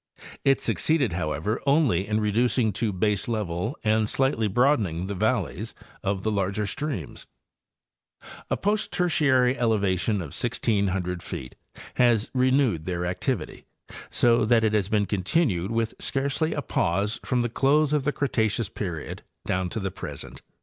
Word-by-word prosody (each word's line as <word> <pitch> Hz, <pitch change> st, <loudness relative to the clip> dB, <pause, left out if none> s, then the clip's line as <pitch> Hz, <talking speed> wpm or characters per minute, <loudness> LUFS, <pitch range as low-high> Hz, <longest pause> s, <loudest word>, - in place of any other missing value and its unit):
It 135 Hz, 0 st, +4 dB
succeeded, 145 Hz, -, +1 dB
however, 80 Hz, +5 st, -2 dB
only 135 Hz, -, +3 dB
in 105 Hz, 0 st, +1 dB
reducing 110 Hz, +1 st, +1 dB
to 110 Hz, +2 st, -1 dB
baselevel 105 Hz, -, -1 dB
and 110 Hz, -1 st, +2 dB
slightly 135 Hz, -5 st, +1 dB
broadening 105 Hz, -, +2 dB
the 100 Hz, -, -3 dB
valleys 110 Hz, 0 st, -1 dB, 0.3 s
of 100 Hz, -1 st, -2 dB
the 110 Hz, -, 0 dB
larger 100 Hz, +1 st, -1 dB
streams. 110 Hz, -, -4 dB, 1.2 s
A -, -, 0 dB
post 210 Hz, +1 st, 0 dB
Tertiary 135 Hz, -8 st, +2 dB
elevation 105 Hz, -3 st, +1 dB
of 85 Hz, -8 st, -4 dB
1,600 100 Hz, -6 st, -1 dB
feet 65 Hz, -5 st, -7 dB, 0.4 s
has 120 Hz, -3 st, +3 dB
renewed 130 Hz, -, +2 dB
their 90 Hz, -1 st, -2 dB
activity, 90 Hz, +1 st, -3 dB, 0.4 s
so 120 Hz, 0 st, +3 dB
that 115 Hz, +1 st, +3 dB
it 110 Hz, -1 st, +2 dB
has 105 Hz, -2 st, +1 dB
been 105 Hz, -2 st, +2 dB
continued 95 Hz, -, 0 dB
with 115 Hz, -1 st, -1 dB
scarcely 140 Hz, +4 st, 0 dB
a 145 Hz, -, -2 dB
pause 100 Hz, +1 st, 0 dB
from 125 Hz, -2 st, 0 dB
the -, -, +1 dB
close 140 Hz, +5 st, +2 dB
of 150 Hz, -2 st, +2 dB
the 150 Hz, -, +1 dB
Cretaceous 110 Hz, -7 st, 0 dB
'period 90 Hz, -8 st, -5 dB, 0.2 s
down 90 Hz, -1 st, -1 dB
to 110 Hz, -, -3 dB
the 95 Hz, -2 st, -3 dB
present. -, -, -8 dB
110 Hz, 145 wpm, -26 LUFS, 95-125 Hz, 1.2 s, It